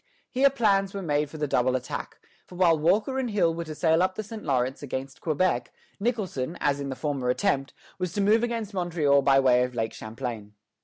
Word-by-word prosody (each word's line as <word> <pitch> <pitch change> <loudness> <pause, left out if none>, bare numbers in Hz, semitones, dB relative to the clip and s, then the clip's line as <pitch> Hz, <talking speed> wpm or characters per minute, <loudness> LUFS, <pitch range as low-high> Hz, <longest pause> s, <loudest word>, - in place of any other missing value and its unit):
Here 275 +2 +4
plans 200 -7 +1
were 195 - -4
made 150 -2 0
for 155 - -9
the 150 - -1
double 130 -1 +2
attack; 125 -1 -5 0.3
for 180 - -12
while 175 -2 +4
Walker 205 - +1
and 255 -2 -1
Hill 195 -6 +2
were 170 0 -4
to 155 -1 -7
sail 160 +1 +3
up 185 0 +1
the 215 - -4
St. 220 +1 -8
Lawrence 130 -2 0
against 135 -1 -6
Quebec, 175 +3 0 0.3
Nicholson, 190 - -2
as 145 -1 +1
in 140 -1 -4
the 135 - -4
former 140 -3 -2
attempt, 135 -2 0 0.2
was 180 -2 -2
to 205 - -2
move 215 +3 +4
against 230 -3 -2
Montreal 165 -6 +2
by 135 0 +4
way 125 -2 +4
of 125 -1 -4
Lake 115 -1 -2
Champlain. 110 -2 -6
160 Hz, 210 wpm, -26 LUFS, 135-195 Hz, 0.3 s, Here